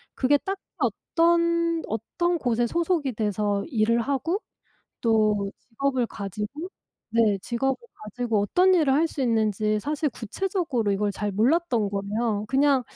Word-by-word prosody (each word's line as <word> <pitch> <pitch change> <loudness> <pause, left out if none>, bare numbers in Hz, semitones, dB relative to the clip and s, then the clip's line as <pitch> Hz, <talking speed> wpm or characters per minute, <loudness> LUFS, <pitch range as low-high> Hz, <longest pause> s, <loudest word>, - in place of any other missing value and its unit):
그게 285 +2 +3
딱히 385 +5 -5 0.2
어떤 335 0 +1
어떤 340 - -1
곳에 240 -4 +1
소속이 335 -4 0
돼서 205 -1 -1
일을 230 -3 +2
하고 285 - -1 0.6
또 215 -3 +2 0.2
직업을 260 0 0
가지고 210 - -6 0.4
네 220 -3 +3
직업을 255 +5 -1 0.3
가지고 220 0 -1
어떤 365 - +4
일을 300 -6 +3
할 320 +4 +3
수 290 - -6
있는지 215 -3 +1
사실 300 +2 -1
구체적으로 260 - -2
이걸 205 +1 0
잘 205 +1 -2
몰랐던 240 - +2
거예요. 205 +2 -1
그냥 275 0 +3
240 Hz, 280 characters per minute, -25 LUFS, 215-320 Hz, 0.6 s, 어떤